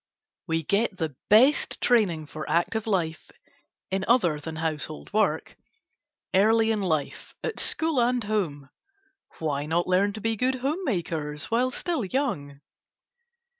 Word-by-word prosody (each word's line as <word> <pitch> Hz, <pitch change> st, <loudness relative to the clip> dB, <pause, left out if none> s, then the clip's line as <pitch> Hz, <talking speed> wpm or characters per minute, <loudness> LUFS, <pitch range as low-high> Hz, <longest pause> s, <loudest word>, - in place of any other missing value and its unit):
We 165 Hz, -1 st, 0 dB
get 200 Hz, +4 st, 0 dB
the 160 Hz, -5 st, -3 dB
best 250 Hz, +8 st, +4 dB
training 195 Hz, -10 st, +2 dB
for 155 Hz, +1 st, -7 dB
active 220 Hz, +6 st, 0 dB
life, 170 Hz, -6 st, -1 dB, 0.6 s
in 190 Hz, 0 st, 0 dB
other 180 Hz, -11 st, +3 dB
than 160 Hz, +2 st, -7 dB
household 155 Hz, 0 st, -4 dB
work, 215 Hz, 0 st, +1 dB, 0.8 s
early 220 Hz, +3 st, +4 dB
in 215 Hz, -2 st, 0 dB
life, 160 Hz, -7 st, -2 dB
at 455 Hz, -, -2 dB
school 320 Hz, -5 st, +2 dB
and 245 Hz, 0 st, +1 dB
home. 165 Hz, -10 st, -2 dB, 0.7 s
Why 145 Hz, -2 st, -2 dB
not 170 Hz, +2 st, +1 dB
learn 195 Hz, +3 st, +2 dB
to 220 Hz, -, -6 dB
be 225 Hz, +1 st, 0 dB
good 255 Hz, +4 st, +1 dB
home 280 Hz, +9 st, -2 dB
makers 160 Hz, -, -2 dB
while 245 Hz, +3 st, +2 dB
still 325 Hz, +1 st, -2 dB
young? 170 Hz, -, -2 dB
195 Hz, 135 wpm, -26 LUFS, 160-235 Hz, 0.8 s, best